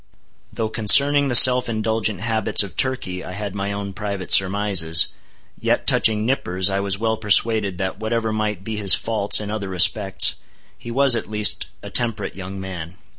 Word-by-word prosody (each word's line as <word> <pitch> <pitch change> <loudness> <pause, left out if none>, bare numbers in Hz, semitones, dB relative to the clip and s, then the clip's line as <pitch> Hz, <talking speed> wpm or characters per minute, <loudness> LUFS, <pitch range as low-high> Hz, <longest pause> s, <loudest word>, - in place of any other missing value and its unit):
Though 110 -1 -5
concerning 140 +7 +4
the 125 - -1
self 125 0 +6
indulgent 110 -3 -3
habits 110 -2 0
of 95 -5 -11
Turkey 95 -8 -3
I 90 - -10
had 100 0 -7
my 100 0 -5
own 100 -1 -7
private 100 -3 -7
surmises, 95 -5 +2 0.5
yet - - -2
touching 110 -1 +1
Nippers 95 -7 -1
I 95 - -2
was 100 -1 -1
well 110 +1 -3
persuaded 105 -2 +1
that 95 +1 -5
whatever 110 0 -3
might 105 -3 -4
be 110 +1 -7
his 100 -3 +5
faults 105 -3 -1
in 105 -1 -7
other 105 -3 -6
respects, 95 0 +2 0.4
he 120 - -12
was, 135 +1 +3
at 110 - -6
least, 105 -1 +2 0.2
a - - -10
temperate 115 -4 -3
young 95 0 -9
man. 90 -2 -9
105 Hz, 175 wpm, -19 LUFS, 95-110 Hz, 0.5 s, self